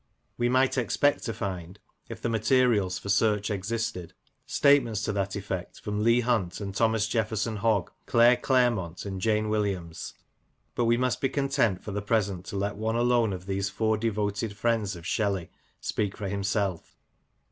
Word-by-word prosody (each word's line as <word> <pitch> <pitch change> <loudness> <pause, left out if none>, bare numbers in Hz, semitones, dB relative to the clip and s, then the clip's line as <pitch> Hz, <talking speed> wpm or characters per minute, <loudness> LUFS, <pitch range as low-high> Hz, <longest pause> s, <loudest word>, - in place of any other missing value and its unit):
We 120 0 +1
might 130 +1 +3
expect 145 +4 +1
to 115 - -2
find, 95 -3 -5 0.3
if - - -8
the - - +1
materials 110 -4 +2
for 100 - -7
search 105 +1 +2
existed, 100 -3 -3 0.3
statements 120 -7 +3
to - - 0
that 100 0 -2
effect 95 -3 -5
from 105 0 -3
Leigh 115 +2 +4
Hunt 110 -8 0
and 100 -2 -5
Thomas 110 +1 +2
Jefferson 110 -1 -1
Hogg, 105 -3 +1 0.2
Claire 120 +1 +5
Clairmont 120 -11 +1
and 95 -2 -5
Jane 110 +1 +1
Williams; 100 -6 -2 0.6
but 120 - 0
we 115 +1 +3
must 125 -2 0
be 135 - +2
content 135 -8 0
for 105 - -6
the 105 +1 -2
present 100 -4 0
to 100 - -5
let 100 +1 -2
one 110 +1 -1
alone 120 -2 +3
of 90 -1 -6
these 95 0 -1
four 110 +3 +1
devoted 105 -1 -2
friends 110 -5 0
of 85 -1 -11
Shelley 100 -3 -1 0.3
speak 105 -2 -2
for 100 - -4
him 100 +1 -3
self. 100 -3 -2
105 Hz, 170 wpm, -27 LUFS, 100-115 Hz, 0.6 s, Claire